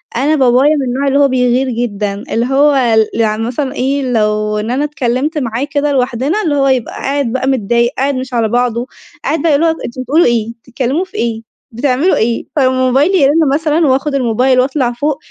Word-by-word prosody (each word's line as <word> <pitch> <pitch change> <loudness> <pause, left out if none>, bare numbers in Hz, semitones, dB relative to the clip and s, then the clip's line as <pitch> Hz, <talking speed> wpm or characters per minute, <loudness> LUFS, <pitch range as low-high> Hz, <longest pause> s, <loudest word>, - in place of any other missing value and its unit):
أنا 285 +6 +1
بابايا 265 +2 +3
من 280 - -1
النوع 265 +3 -1
اللي 275 +1 +2
هو 280 - +5
بيغير 255 0 +1
جدًا، 210 -4 -3
اللي 230 +2 0
هو 270 -3 +2 0.2
ل - - -4
يعني 220 0 0
مثلًا 260 +3 -3
إيه، 275 +2 -1
لو 215 -1 0
إن 220 +3 -3
أنا 275 +4 0
اتكلّمت 290 +1 -2
معاه 235 -2 -2
كده 290 0 0
لوحدنا 265 - 0
اللي 300 -4 0
هو 275 -1 +2
يبقى 260 -3 0
قاعد 275 -4 -2
بقى 260 0 -1
متضايق 235 -1 +1
قاعد 275 +1 0
مش 255 0 -5
على 230 -2 +1
بعضه، 245 +1 -1 0.4
قاعد 315 -2 -1
بقى 315 -4 +2
اللي 325 +4 +2
هو - - +4 0.2
أنتم 245 +2 -6
بتقولوا 290 +7 +2
إيه؟ 230 -2 0
بتتكلموا 265 +8 -2
في - - -23
إيه؟ 225 -1 -3 0.2
بتعملوا 265 +8 +1
ايه؟ 230 +1 -1
فلمّا 265 -3 +3 0.2
موبايلي 290 +10 +2
يرن 295 0 +3
مثلًا 310 +1 +1
وآخد 275 +2 0
الموبايل 255 +1 +2
وأطلع 260 -1 0
فوق، 285 +4 -2
260 Hz, 200 wpm, -14 LUFS, 235-285 Hz, 0.4 s, هو